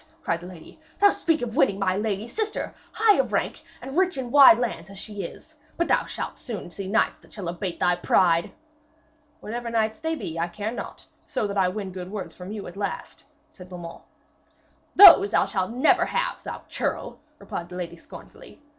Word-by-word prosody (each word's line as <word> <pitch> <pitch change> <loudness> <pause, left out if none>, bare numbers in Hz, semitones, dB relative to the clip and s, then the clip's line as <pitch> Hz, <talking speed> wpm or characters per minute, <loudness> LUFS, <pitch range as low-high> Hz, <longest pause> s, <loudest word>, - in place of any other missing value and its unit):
cried 165 0 -1
the 175 - -9
lady. 180 - -13 0.2
'Thee 410 - +4
to 405 - +8
speak 325 -2 0
of 225 -2 -4
winning 195 - +3
my 190 -2 0
lady 210 +1 -2
sister, 430 - -3 0.2
high 435 -2 +4
of - - 0
rank - - -2 0.2
and 270 +1 -7
rich 370 -2 +2
in 250 -2 -4
wide 290 +4 +9
lands 225 -8 -3
as 195 - -11
she 205 0 -5
is! 195 - -9 0.2
But 340 - +1
thou - - +3
shalt - - -6
soon 210 -8 -7
see 195 +1 -6
knights 220 +4 +1
that - - -21
shall 195 -5 -7
abate 175 +1 -4
thy 180 0 +3
pride.' 170 -1 +2 0.9
'Whatever 235 +2 -5
knights 220 0 0
they 320 0 -2
be, 165 - -5
I 170 - 0
care 210 +5 -4
not, 245 - -8 0.2
so - - -2
that 200 -1 -3
I 190 -2 +3
win 195 0 -4
good 180 -1 -7
words 200 -2 -6
from 180 +2 -9
you 210 -2 -6
at 175 - -9
last,' 200 0 -5 0.3
said 180 -1 -14
Beaumains. 175 -2 -9 0.9
'Those 365 - +10
thou - - +3
shalt 185 -2 -2
never 245 +3 +3
have, - - -2
thou - - -7
churl,' - - -3 0.2
replied 170 0 -7
the 180 - -9
lady 175 -2 -5
scornfully. - - -14
205 Hz, 200 wpm, -25 LUFS, 180-245 Hz, 0.9 s, Those